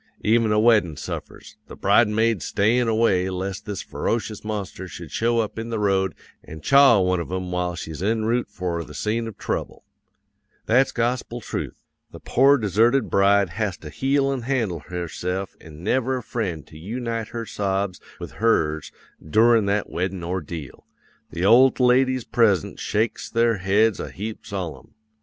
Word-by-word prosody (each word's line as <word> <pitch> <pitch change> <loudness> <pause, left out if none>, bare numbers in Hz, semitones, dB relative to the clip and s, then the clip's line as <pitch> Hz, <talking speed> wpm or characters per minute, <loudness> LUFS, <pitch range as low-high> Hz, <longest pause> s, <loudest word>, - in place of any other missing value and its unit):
Even 115 0 +3
a 105 - +3
weddin' 105 - +3
suffers; - - -8
the - - -10
bridesmaids 105 -1 +2
stayin' 115 +8 +2
away 110 -5 +2
lest 95 +1 -5
this 100 -3 -4
ferocious 110 -2 -3
monster 100 -3 -5
should 85 -3 -9
show 115 +6 +1
up 110 0 -5
in 115 +1 -5
the 115 - -2
road 95 -4 +1 0.3
an' 80 - -10
chaw 135 - +6
one 90 -1 +1
of 85 - -5
'em 95 -1 -3
while 90 -1 -1
she's 80 -1 -7
en 110 +2 0
route 120 0 0
for 90 -4 -3
the 75 - -12
scene 115 +2 -1
of 110 - -9
trouble. - - -4 0.8
That's 130 +4 +3
gospel 120 0 -2
trooth! - - -5 0.3
the - - -11
pore 140 +3 +4
deserted 115 +4 +2
bride 100 -1 +4
has 105 -2 -2
to 75 - -10
heel 135 - +1
an' 130 - -3
handle 115 -9 -1
herse'f 90 +3 -4
an' 80 +1 -12
never 130 +5 +1
a 125 - -6
friend 95 -10 -4
to 75 - -14
yoonite 115 +4 -4
her 115 -1 -5
sobs 100 -3 -2 0.2
with - - -7
hers 80 -9 0 0.3
doorin' 110 +6 +4
that 100 +1 0
weddin' 90 0 -3
ordeal. 85 -4 -5 0.5
The 85 +2 -3
old 125 +6 +6
ladies 130 0 +3
present 105 -9 +1
shakes 110 +2 -1
their 115 -1 +2
heads 100 +3 +2
a - - -5
heap 110 +3 -7
solemn. 90 - -6
105 Hz, 165 wpm, -23 LUFS, 90-115 Hz, 0.8 s, chaw